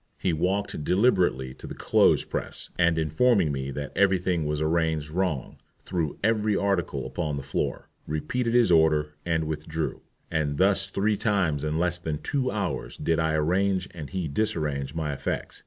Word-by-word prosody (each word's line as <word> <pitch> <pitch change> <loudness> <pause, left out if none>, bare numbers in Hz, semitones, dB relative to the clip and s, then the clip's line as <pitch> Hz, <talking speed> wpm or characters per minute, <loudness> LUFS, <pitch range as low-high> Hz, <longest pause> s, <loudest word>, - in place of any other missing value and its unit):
He 90 - 0
walked 90 0 -1
deliberately 90 - +2
to - - -10
the - - -7
clothes - - +3
press, - - -6
and, 85 -2 +3
informing 80 +3 +3
me 65 -1 -3
that 70 0 -5
every 100 -1 +4
thing 90 -4 -1
was 75 0 -1
arranged 80 -1 0
wrong, 85 -6 -2 0.3
threw 85 -5 -2
every 110 -1 +2
article 100 -4 0
upon 75 -4 -3
the 70 - -5
floor, 70 - -2 0.2
repeated 115 +11 -1
his 120 -6 +5
order, 75 -2 +4
and 80 -1 +1
withdrew. 80 +1 -3 0.3
And 75 -3 0
thus 95 +1 +3
three 105 +2 0
times 90 -10 +1
in 75 0 -1
less 90 +1 0
than 80 -3 -3
two 130 - -1
hours 100 -6 -3
did 80 0 0
I 80 -1 +1
arrange 95 +4 +1
and 80 -5 -7
he 95 -4 -2
disarrange 75 -5 -2
my 75 -3 -1
effects. 70 - -4
80 Hz, 170 wpm, -26 LUFS, 75-95 Hz, 0.3 s, his